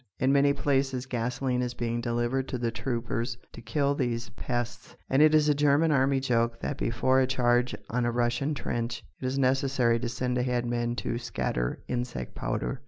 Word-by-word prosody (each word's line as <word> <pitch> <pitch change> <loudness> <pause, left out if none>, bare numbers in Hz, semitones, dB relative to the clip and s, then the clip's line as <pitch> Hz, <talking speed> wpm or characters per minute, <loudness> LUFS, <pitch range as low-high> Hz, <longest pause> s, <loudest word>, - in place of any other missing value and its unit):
In 130 +1 +2
many 140 0 +5
places 135 -2 0
gasoline 125 +1 -1
is 125 -1 -3
being 120 0 -2
delivered 120 +3 -1
to 130 - -3
the 120 -1 -1
troopers 115 +1 -2 0.2
to 120 - -9
kill 140 +5 +1
these 120 -4 -2
pests, 120 +1 -4 0.2
and 135 +2 +4
it 155 0 +6
is 150 -1 +4
a 150 - +5
German 145 +2 +3
army 135 -1 +3
joke 115 -3 0
that 145 - -2
before 130 +3 +2
a 130 - +3
charge 125 -1 +2 0.2
on 125 +2 +1
a 120 - +1
Russian 120 +5 0
trench 120 -3 -3 0.2
it - - -3
is 130 +2 -1
necessary 130 -3 +2
to 120 0 -2
send 125 +1 -1
ahead 125 -1 0
men 120 0 -1
to 120 - -2
scatter - - -2
insect 120 - -3
powder! - - -3
125 Hz, 185 wpm, -28 LUFS, 120-135 Hz, 0.2 s, it